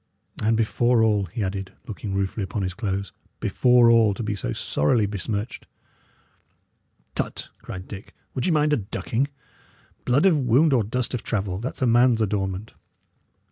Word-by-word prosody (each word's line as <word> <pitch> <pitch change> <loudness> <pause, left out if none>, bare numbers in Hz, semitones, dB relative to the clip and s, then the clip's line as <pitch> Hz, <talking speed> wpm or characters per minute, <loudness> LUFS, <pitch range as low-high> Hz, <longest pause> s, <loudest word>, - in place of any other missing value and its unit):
And 110 +1 +2
before 115 +1 +2
all," 105 -3 +2
he 105 +6 -4
added, 95 0 -4
looking 100 -2 -5
ruefully 100 +2 -1
upon 100 +1 -3
his 90 -1 -2
clothes 100 -1 -3 0.3
"before 125 -1 +4
all, 110 -3 +4
to 115 - -4
be 105 -1 -1
so 100 -11 -3
sorrily 105 - +1
besmirched!" 105 +2 -4 1.5
"Tut!" - - -3
cried 95 0 -8
Dick. 100 -1 -10 0.2
"Would 130 - -1
ye - - +2
mind 150 -1 +3
a - - +3
ducking? 115 +5 -2 0.8
Blood 135 +8 +3
of 170 -6 +5
wound 135 +4 +4
or 120 -4 +3
dust 125 +5 -2
of 125 - -2
travel 95 -4 -2
that's 130 +3 -4
a - - +4
man's 120 0 +4
adornment." 100 -1 -2
110 Hz, 160 wpm, -24 LUFS, 100-125 Hz, 1.5 s, of